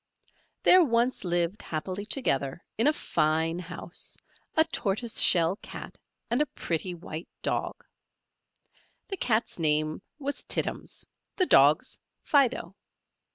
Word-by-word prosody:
There 365 0 +7
once 240 -3 +1
lived 175 +2 0
happily 185 +6 -4
together, 140 - -1
in 230 +5 +2
a - - +6
fine 160 - 0
house, 170 0 -6 0.4
a 315 - +6
tortoise 230 -6 -1
shell 170 +2 +5
Cat - - -9 0.3
and - - +1
a 300 - +2
pretty 175 -6 -3
white 165 -1 -7 0.2
Dog: - - -2 1.2
the 390 - -3
Cat's 225 - 0
name 155 -1 +1 0.2
was 285 -1 -3
Tittums; - - -2 0.3
the 370 - +2
Dog's, 145 - +4 0.2
Fido. 275 -4 +2
185 Hz, 115 wpm, -28 LUFS, 165-255 Hz, 1.2 s, There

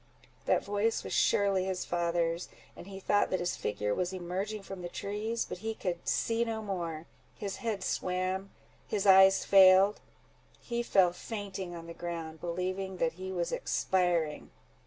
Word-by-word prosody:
That - - +2
voice 205 +3 0
was - - -5
surely 195 -2 +3
his 190 -1 -2
father's, 170 0 -1 0.3
and 175 - -11
he 195 -1 -8
thought 205 +1 +2
that 185 - 0
his 175 0 -1
figure 105 0 -2
was 180 - -1
emerging 190 +3 -4
from 195 -1 -8
the 175 - -5
trees; 215 +5 -3
but - - -6
he 225 +2 -3
could 175 -4 -4
see 230 0 +1
no 225 -1 -3
more:—his 175 +1 -6
head 215 -5 -3
swam—his 190 +2 -3
eyes 190 0 +7
failed—he 195 +5 +3
fell 190 -6 +3
fainting 195 -3 -6
on 165 -1 -8
the 170 - -8
ground, 165 -2 -6
believing 185 +2 -3
that 165 -2 0
he 190 0 -4
was 175 -2 -2
expiring. 175 -5 0
190 Hz, 150 wpm, -31 LUFS, 175-200 Hz, 0.3 s, eyes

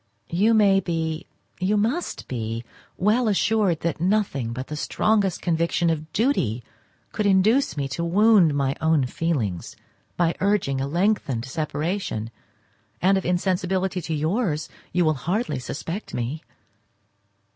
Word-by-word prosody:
You 210 +7 +3
may 200 -3 +5
be—you 170 +3 -3
must 240 +12 -1
be—well 125 - -2
assured 205 -4 +2
that 165 -1 -2
nothing 180 - 0
but 130 +2 -5
the 150 - -6
strongest 200 +4 +1
conviction 170 0 +1
of 155 -1 -4
duty 140 - 0 0.5
could 210 - 0
induce 200 - +3
me 140 -1 -1
to 170 +6 -3
wound 185 -3 +4
my 140 -1 0
own 160 -4 +3
feelings 125 - -2 0.4
by 170 -1 +2
urging 190 -10 +1
a 135 - -1
lengthened 170 - 0
separation, 150 - -3 0.7
and 190 +2 +4
of 190 - -1
insensibility 185 +1 0
to 160 0 -3
yours 160 +1 -1 0.2
you 175 0 +2
will 155 - +3
hardly 180 - -2
suspect 165 +9 -5
me. 125 +6 -3
170 Hz, 125 wpm, -24 LUFS, 145-200 Hz, 0.7 s, may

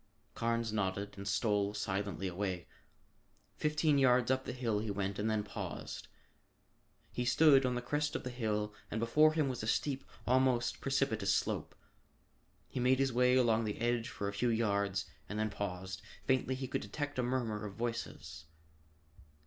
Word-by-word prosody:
Carnes 115 -1 -1
nodded 100 -1 -1
and 100 0 -7
stole 105 0 +1
silently 100 -1 -2
away. 90 -1 -3 0.9
Fifteen 150 -1 +2
yards 125 -1 +4
up 130 0 +1
the - - -3
hill 120 -5 -1
he 110 0 -3
went 100 0 -2
and 110 +2 0
then 110 -1 +1
paused. 105 - -6 1.0
He 125 - -2
stood 135 0 +5
on 125 - 0
the 125 - -3
crest 145 +3 -1
of - - -2
the 125 - -4
hill 105 -3 -1 0.2
and 110 - -2
before 150 +7 +5
him 155 -3 +2
was 130 -2 -3
a 110 - -4
steep, 135 +3 0 0.2
almost 130 -1 +2
precipitous 110 -8 +1
slope. - - -2 0.9
He - - -5
made 125 +1 +4
his 135 -1 +1
way 125 +1 +4
along 115 -3 +4
the 105 - -3
edge 120 0 0
for 100 - -4
a 100 - -3
few 120 +5 +1
yards 100 -3 +1 0.2
and 105 - -4
then 110 0 0
paused. 95 -1 -4 0.2
Faintly 130 0 +2
he 130 0 -4
could - - -2
detect 145 -3 -4
a - - +4
murmur 120 -4 -1
of 100 -2 -6
voices. 100 - -4
115 Hz, 170 wpm, -34 LUFS, 100-130 Hz, 1.0 s, stood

